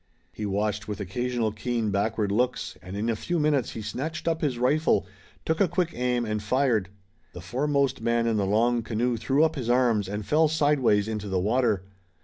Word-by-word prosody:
He 105 - -4
watched 105 +1 -1
with 105 0 -4
occasional 115 +3 -1
keen 110 0 -2
backward 100 +1 0
looks, 120 +5 0
and 90 +2 -7
in 110 +3 -1
a 115 - +1
few 175 +10 -2
minutes 150 -5 +1
he 110 - -6
snatched 155 +9 -4
up 165 -1 0
his 140 -5 0
rifle, 145 +6 +2 0.4
took 160 +3 0
a 195 - +5
quick 175 0 -1
aim 125 -1 0
and 105 -1 -2
fired. 115 -3 +1 0.4
The 90 - -8
foremost 140 +7 0
man 115 0 +1
in 115 -1 +1
the 100 -2 0
long 115 +4 +2
canoe 120 +2 -1
threw 135 +6 +2
up 160 0 +2
his 125 -5 -3
arms, 120 -6 +2
and 105 0 -4
fell 155 +5 +3
sideways 145 -9 +2
into 105 -2 -4
the 95 - 0
water. 110 -1 +1
120 Hz, 195 wpm, -26 LUFS, 105-140 Hz, 0.4 s, a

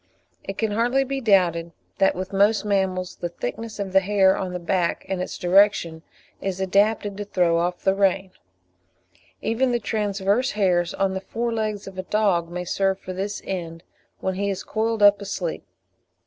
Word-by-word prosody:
It 195 - -6
can 220 -2 0
hardly 240 +5 +2
be 270 0 -3
doubted 175 -6 +2 0.3
that 195 - +4
with 185 +2 -5
most 205 +2 +3
mammals 190 -3 -1
the 175 - -3
thickness 215 - -6
of 195 -2 -4
the 190 - +7
hair 190 0 +3
on 185 -1 -3
the 180 - -3
back 175 0 -1
and 190 -2 -2
its - - -5
direction, 180 -3 +3 0.4
is 190 -1 -3
adapted 200 +1 +1
to 205 - -3
throw 175 -4 +1
off 175 +1 -2
the 190 - +3
rain; 195 -1 +1 1.1
even 250 +3 +1
the 240 - +2
transverse 210 +3 0
hairs 180 -4 +1
on 195 -1 0
the 190 - -3
fore 235 +4 -3
legs 215 -2 -2
of 190 -1 -9
a - - +1
dog 190 -5 +1
may 180 +1 -5
serve 195 +1 0
for 185 - -7
this 200 +2 -4
end 170 -3 -5 0.4
when 190 - -1
he 200 +2 -1
is 195 - -3
coiled 225 -1 -1
up 205 0 +6
asleep. 190 -4 -4
195 Hz, 180 wpm, -23 LUFS, 185-210 Hz, 1.1 s, the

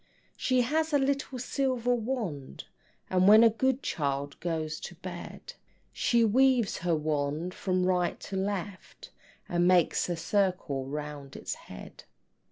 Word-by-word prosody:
She 255 -1 +2
has 315 +5 0
a - - +6
little 275 -1 -1
silver 250 -1 0
wand, 220 - -4 0.5
And 185 0 +4
when 215 +2 +9
a 230 - +6
good 260 +4 0
child 140 -1 -2
goes 160 -3 -3
to 175 - -8
bed 180 - -8 0.4
She 235 -2 +3
waves 250 -1 +3
her 170 -1 +1
wand 150 +3 -2
from 185 -1 0
right 180 -1 +1
to 195 - -6
left, 195 0 -4 0.4
And 175 0 +2
makes 180 -1 +3
a 175 - 0
circle 175 -7 -1
round 145 -1 -6
its - - -4
head. - - -12
185 Hz, 140 wpm, -29 LUFS, 155-245 Hz, 0.5 s, when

